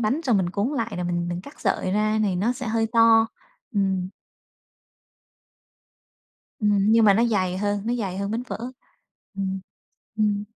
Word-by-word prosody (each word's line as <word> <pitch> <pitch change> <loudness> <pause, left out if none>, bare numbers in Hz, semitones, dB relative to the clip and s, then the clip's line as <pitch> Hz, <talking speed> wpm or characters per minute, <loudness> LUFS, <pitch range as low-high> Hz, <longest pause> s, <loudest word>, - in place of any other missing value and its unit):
bánh 240 +7 0
rồi 245 -6 +3
mình 185 -3 0
cuốn 200 +5 -1
lại 230 -2 -2
rồi 180 - -3
mình 175 0 -1
mình 175 0 -3
cắt 285 +10 -14
sợi 195 -2 0
ra 215 +1 +1
thì 195 -4 0
nó 210 +7 +1
sẽ 255 0 -6
hơi 225 0 +1
to. 230 -1 +6 0.5
Ừm. 190 -2 0 2.5
Ừm, 205 -1 +3
nhưng 225 0 +5
mà 200 -2 +6
nó 230 +4 +3
dày 185 -5 0
hơn, 205 0 -1
nó 240 - +1
dày 195 -6 -3
hơn 200 0 -2
bánh 230 +3 -2
phở. - - -5 0.8
Ừm, 190 -1 -3 0.6
ừm. 210 -1 +1
205 Hz, 170 wpm, -24 LUFS, 190-225 Hz, 2.5 s, to